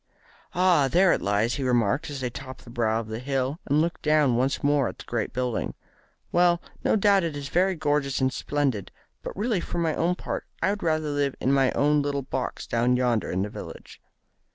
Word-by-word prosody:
"Ah, 175 -6 +4
there 180 +8 +4
it - - -1
lies!" 105 +4 +1
he 140 - -2
remarked, 125 +4 +1
as 140 -2 -5
they 125 - -1
topped 130 +1 -9
the 120 - -12
brow 115 -2 +1
of 115 - -6
the 110 +1 -5
hill, 135 +3 -2
and 145 +2 +3
looked 170 +1 -2
down 150 -5 +3
once 130 +3 0
more 145 -3 +3
at - - -7
the - - -11
great 120 -3 -2
building. 125 -2 -2 0.6
"Well, 175 -1 +4 0.2
no - - +3
doubt 200 -2 +4
it 160 -3 -3
is 140 0 -6
very 185 +2 +2
gorgeous 145 -3 0
and 130 -1 +1
splendid, 135 -10 -1 0.3
but - - -7
really 215 -1 0
for 175 - -5
my 165 -2 +1
own 170 +4 +1
part - - -5
I 190 - +2
would 205 - -4
rather 155 -2 0
live 145 -2 0
in 135 - +1
my 135 -2 +3
own 150 +1 +3
little 140 -1 -2
box 130 0 -4
down 120 +2 +1
yonder 120 -3 +1
in 95 +2 0
the 105 - -3
village." - - -10
140 Hz, 215 wpm, -26 LUFS, 125-160 Hz, 0.6 s, Ah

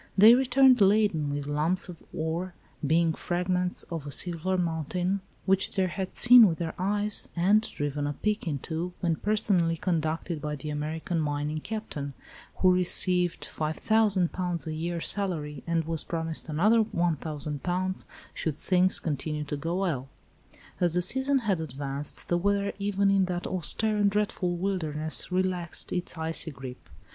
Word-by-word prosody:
They 215 +4 +9
returned 260 -1 +4
laden 195 -7 +3
with 145 0 -3
lumps 155 +7 -1
of 180 -2 -9
ore, 165 +3 -3 0.3
being 160 +2 +2
fragments 180 +2 -1
of 160 -4 -6
a - - -6
silver 175 +4 +3
mountain 175 +3 -1 0.2
which 195 0 +1
they 190 -2 +2
had 185 +1 -4
seen 245 -2 +9
with 165 -3 -1
their 165 -2 -3
eyes 205 +2 0
and 195 +5 +4
driven 145 -7 -3
a 145 - -2
pick 210 +5 -2
into 160 +4 -3
when 170 -3 0
personally 195 -6 +1
conducted 160 -1 -2
by 150 0 -3
the 150 +2 -6
American 155 +3 -3
"mining 150 0 -2
Captain," 155 -9 -6 0.4
who 185 -1 +4
received 180 -1 +2
£5,000 180 +1 0
a 160 - -4
year 170 +2 -3
salary, 160 -9 -2
and 165 -1 +1
was 165 -1 +1
promised 165 -1 -3
another 210 +9 +3
£1,000 170 0 -2 0.3
should 155 -3 -3
things 185 0 +2
continue 150 -1 -3
to 145 0 -4
go 165 +4 -3
well. 140 -9 -2 0.7
As 175 -2 +2
the 180 - +2
season 265 +8 +3
had 190 -6 +1
advanced 140 -1 -5
the 175 - +1
weather 200 +1 0
even 200 0 +1
in 195 -1 +3
that 180 -1 -4
austere 210 +5 +1
and 205 -1 +3
dreadful 195 -3 -1
wilderness 160 -4 -2
relaxed 180 -2 -1
its 180 -1 -3
icy 160 0 -2
grip. 130 - -10
175 Hz, 150 wpm, -27 LUFS, 155-195 Hz, 0.7 s, They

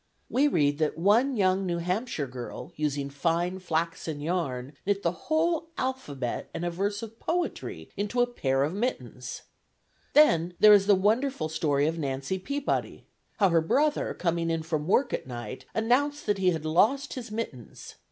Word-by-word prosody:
We 280 +3 +4
read 145 - +2
that 155 -1 0
one 225 +10 +3
"young 190 -1 +2
New 175 -1 0
Hampshire 180 - -2
girl, 125 +6 -8
using 145 -2 -2
fine 170 +5 0
flaxen 165 -3 -2
yarn, 145 -5 -2
knit 200 0 0
the 170 - +2
whole 320 - 0
alphabet 150 - -3
and 165 +1 -3
a 175 - -1
verse 200 +4 -2
of 225 0 -9
poetry 350 +1 -3
into 205 +4 -2
a 245 - +5
pair 135 - 0
of 150 +4 -1
mittens!" 130 - -4 0.7
Then 175 - +5
there 215 0 +9
is 200 -1 +5
the 205 - +7
wonderful 215 - +1
story 145 -3 +1
of 165 +2 -1
Nancy 140 +5 -2
Peabody. 280 +9 -2 0.3
How 195 -3 +4
her 165 -1 +4
brother, 290 - +1
coming 170 -1 0
in 165 -1 -1
from 155 -1 -2
work 250 +7 +2
at - - -3
night, 130 +1 -7
announced 270 +6 +1
that 205 -2 +1
he 185 -1 +4
had 160 -3 -2
lost 240 - +2
his 250 -4 -6
mittens. 210 - -6
180 Hz, 170 wpm, -28 LUFS, 155-225 Hz, 0.7 s, there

